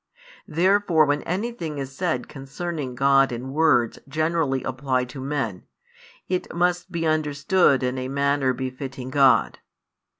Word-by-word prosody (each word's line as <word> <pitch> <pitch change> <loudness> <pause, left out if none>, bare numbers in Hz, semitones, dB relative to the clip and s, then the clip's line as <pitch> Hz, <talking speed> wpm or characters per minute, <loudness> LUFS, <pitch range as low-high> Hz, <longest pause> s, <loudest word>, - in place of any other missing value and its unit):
Therefore 180 -1 +3
when 145 0 0
anything 180 -5 -3
is 135 -1 -6
said 160 -7 -2
concerning 140 0 -6
God 135 +1 +4
in 125 +3 -5
words 140 -7 +2
generally 155 -3 0
applied 130 -1 -1
to 135 0 -8
men, 135 -9 -3 0.6
it 185 0 -2
must 175 0 0
be 165 -1 -2
understood 155 -1 +2
in 125 +1 -1
a 130 - -3
manner 140 0 +1
befitting 130 0 -6
God. 130 -5 +3
140 Hz, 130 wpm, -24 LUFS, 130-160 Hz, 0.6 s, God